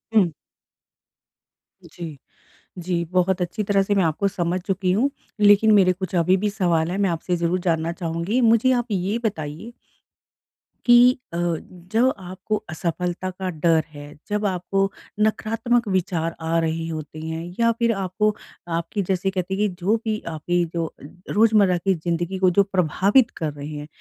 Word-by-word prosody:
हुँ। 190 -6 +5 1.5
जी। 165 -4 -9 0.6
जी, 175 -1 -1
बहुत 180 +2 +1
अच्छी 180 +5 -2
तरह 200 -1 +2
से 205 +1 0
मैं 195 -2 +3
आपको 165 +5 +1
समझ 180 -1 -2
चुकी 190 -2 0
हूँ 240 +9 +2 0.3
लेकिन 210 +1 +6
मेरे 190 -3 +5
कुछ 185 0 -6
अभी 175 +2 +3
भी 205 +2 -1
सवाल 175 -5 +1
है 185 - -2
मैं 200 -2 +2
आपसे 170 +2 -1
ज़रूर 170 +1 0
जानना 165 0 0
चाहूँगी। 170 +6 -2
मुझे 230 +2 +4
आप 240 -2 0
ये 200 +3 0
बताइए 160 +2 -4 1.1
कि 245 +1 +7 0.2
अ, - - -2
जब 180 +8 -1
आपको 185 +3 -4
असफलता 175 +3 -3
का 185 0 -5
डर 165 -1 +2
है, 145 0 -10 0.2
जब 210 0 -1
आपको 195 +1 0 0.3
नकारात्मक 225 +2 +1
विचार 175 -3 -1
आ 165 +1 0
रहे 165 0 -1
होते 155 -1 -6
हैं 160 +1 -4 0.2
या 230 0 +4
फ़िर 235 0 +1
आपको 205 +2 0 0.4
आपकी 170 +5 -3
जैसे 190 0 +1
कहते 185 0 -3
हैं 205 +2 +1
कि 180 - -10
जो 205 +5 +3
भी 215 -1 -1
आपकी 170 +2 0
जो 165 -2 -2 0.4
रोज़मर्रा 210 -4 +4
की 190 +3 +1
ज़िंदगी 175 +3 -2
को 185 -1 +4
जो 200 +3 +4
प्रभावित 195 - +2
कर 155 -3 -2
रहे 145 0 -7
हैं। 150 -1 -7
185 Hz, 160 wpm, -23 LUFS, 170-205 Hz, 1.5 s, कि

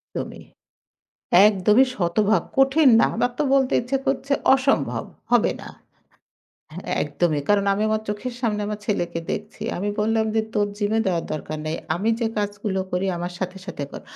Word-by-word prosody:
একদমই। - - -5 1.0
একদমই 210 +4 +4
শতভাগ। 200 +4 +2
কঠিন 270 +2 +5
না। - - +5
আমার 245 +2 +1
তো - - +2
বলতে 265 -1 +2
ইচ্ছে 250 +3 -1
করছে। 270 +1 -1 0.2
অসম্ভব, 270 +1 0 0.3
হবে - - +4
না। - - -9 1.2
এ - - -2
একদমই। 155 -4 0
কারণ, 205 -1 +3
আমি 205 +2 -1
আমার 215 0 0
চোখের 220 +4 -4
সামনে 215 -4 0
আমার 210 0 -4
ছেলেকে 175 -5 -1
দেখছি। 210 +1 -6
আমি 200 +3 -2
বললাম 220 +1 +1
যে, 220 - +3
"তোর 205 -1 +1
জিম 205 0 -1
এ - - +3
দেওয়ার 175 -3 0
দরকার 155 0 -5
নাই। 155 +1 -2 0.2
আমি 200 +6 0
যে 230 - +1
কাজগুলো 205 -1 -2
করি 180 +2 0
আমার 175 +1 -4
সাথে, 185 0 -4
সাথে 145 - -5
কর।" - - -8
210 Hz, 170 wpm, -23 LUFS, 185-230 Hz, 1.2 s, কঠিন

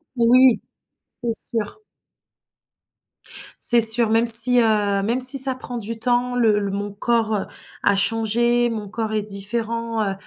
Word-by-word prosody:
Oui, 245 0 +2 0.6
c'est 235 -1 -3 0.2
sûr. 225 - -6 1.9
C'est 240 - +4
sûr, 225 0 +6
même 225 +1 0
si, 235 +2 +7
heu, 205 -3 -1
même 235 +5 -3
si 255 +2 +5
ça 265 0 +1
prend 255 -1 -10
du 230 0 -9
temps, 245 +1 -2
le 225 -4 0
l 200 -1 -4
mon 205 +1 -6
corps, 220 +1 -3
heu, 195 - -5 0.4
a 200 - +1
changé, 230 +3 -1
mon 210 -3 -8
corps, 220 +1 -6
est 215 - -2
différent, 225 +3 -5
heu 200 -2 -3
230 Hz, 150 wpm, -19 LUFS, 210-240 Hz, 1.9 s, si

